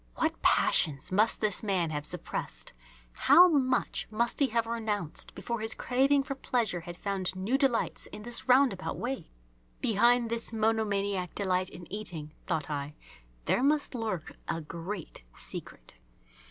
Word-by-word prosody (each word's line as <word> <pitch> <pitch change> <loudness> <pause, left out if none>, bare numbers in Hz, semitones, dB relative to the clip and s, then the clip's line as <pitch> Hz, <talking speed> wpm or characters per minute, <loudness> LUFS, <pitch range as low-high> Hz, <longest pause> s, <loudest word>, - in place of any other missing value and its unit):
What - - -1
passions 140 0 +2
must 210 +4 +2
this 210 -3 0
man 185 -6 0
have 150 -1 -3
suppressed, - - -5 0.4
how 355 - +7
much 270 -6 +1
must 230 +2 0
he 280 - +5
have 230 -1 0
renounced, 215 -7 -2
before 235 -1 -3
his 220 +1 -1
craving 275 +2 +2
for 275 0 -4
pleasure 235 -8 0
had 175 0 -9
found 190 -2 -2
new 195 +7 0
delights 270 -4 +1
in 210 - -9
this 240 +2 -2
roundabout 250 -7 +3
way! 250 -7 -4 0.5
Behind 235 +3 +3
this 230 -1 0
monomaniac 205 -4 0
delight 185 -2 0
in 175 - -10
eating, 165 -8 -5
thought 150 -3 -1
I, 145 0 -4 0.5
there - - +2
must 290 +2 +2
lurk 220 -9 -3 0.2
a - - -1
great 165 - -7
secret. - - -7
215 Hz, 145 wpm, -30 LUFS, 180-240 Hz, 0.5 s, how